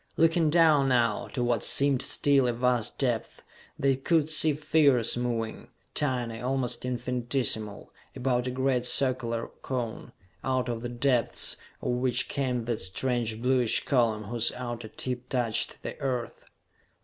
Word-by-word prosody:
Looking 165 0 +3
down 155 -4 +4
now, 115 -4 +1
to 125 - -3
what 120 -3 0
seemed 140 -2 +4
still 140 -3 +2
a 120 - +1
vast 120 -2 0
depth, 120 -5 -2 0.3
they 135 -1 +2
could 155 +3 +1
see 155 0 +3
figures 145 -5 +2
moving, 120 -2 -3 0.3
tiny, 120 -5 -2
almost 125 -1 -1
infinitesimal, 120 -3 -2 0.2
about 125 -1 0
a - - 0
great 130 -1 0
circular 125 -3 0
cone, 120 -4 -4 0.3
out 130 -1 0
of 115 -1 -3
the 120 - -4
depths 120 -1 +1 0.3
of - - 0
which 125 0 0
came 125 -4 -1
that 115 -2 -2
strange 115 +3 -2
bluish 125 -3 +2
column 115 -5 +1
whose 115 +2 +1
outer 120 -2 -5
tip 125 +2 -4
touched 120 -4 -1
the - - -5
Earth. 125 -3 -3
125 Hz, 140 wpm, -28 LUFS, 120-135 Hz, 0.3 s, down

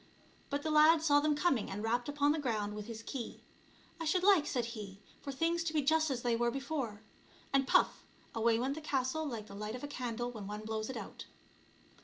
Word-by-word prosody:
But 285 +1 -2
the 315 - -1
lad 310 +1 +6
saw 290 -2 +5
them 300 0 +2
coming, 290 -7 +1
and 205 +2 -4
rapped 240 +4 0
upon 290 0 +2
the 310 - 0
ground 215 -7 -1
with 210 0 -6
his 225 -1 -7
key. 245 -1 -6 0.3
" - - -29
I - - -2
should 360 +4 +2
like," 380 -7 +5
said 245 -3 0
he, 200 -4 -8
" - - -28
for 280 - -5
things 330 +5 0
to 320 - -1
be 300 -2 +2
just 315 +2 +3
as 250 -3 -2
they 240 -1 +2
were 240 +1 +2
before 265 -5 -3 0.2
;" - - -27
and 270 -1 +3
puff! - - +3 0.3
away 225 0 +3
went 260 +4 0
the 315 - -7
castle 290 +1 -1
like 230 -6 -5
the 200 - -12
light 210 +3 -4
of 255 - -8
a - - -3
candle 245 -3 -3
when 215 -5 -7
one 210 +1 -5
blows 220 +1 -3
it 265 - -4
out. - - -8
260 Hz, 240 wpm, -34 LUFS, 225-300 Hz, 0.3 s, lad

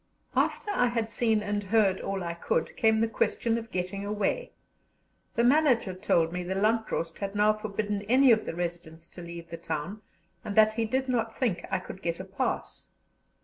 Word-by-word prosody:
After 415 - +1
I 305 -11 +3
had 230 -2 -1
seen 220 -3 +1
and 205 0 -1
heard 195 -2 +3
all 195 -1 -3
I 170 0 -3
could, 165 -1 -1
came 220 -3 +3
the 225 - +3
question 225 +1 0
of 230 0 -10
getting 185 +2 -3
away. 210 - -1 0.8
The 235 - +2
manager 250 -6 +3
told 170 -3 +1
me 180 - -2
the 185 +2 -3
Landrost 210 -5 0
had 200 0 -4
now 210 +1 +4
forbidden 210 -1 -3
any 260 +1 +6
of 220 -1 +4
the - - -3
residents 170 -1 -5
to 175 - -11
leave 170 -1 -9
the 170 - -5
town, 170 +6 -4 0.4
and 200 - -5
that 215 0 +6
he 225 0 0
did 260 +4 -1
not 230 -3 -1
think 195 -10 -1
I 190 - +1
could 185 +1 -9
get 170 -1 -2
a 185 - -6
pass. 195 +7 -3
205 Hz, 190 wpm, -28 LUFS, 180-225 Hz, 0.8 s, any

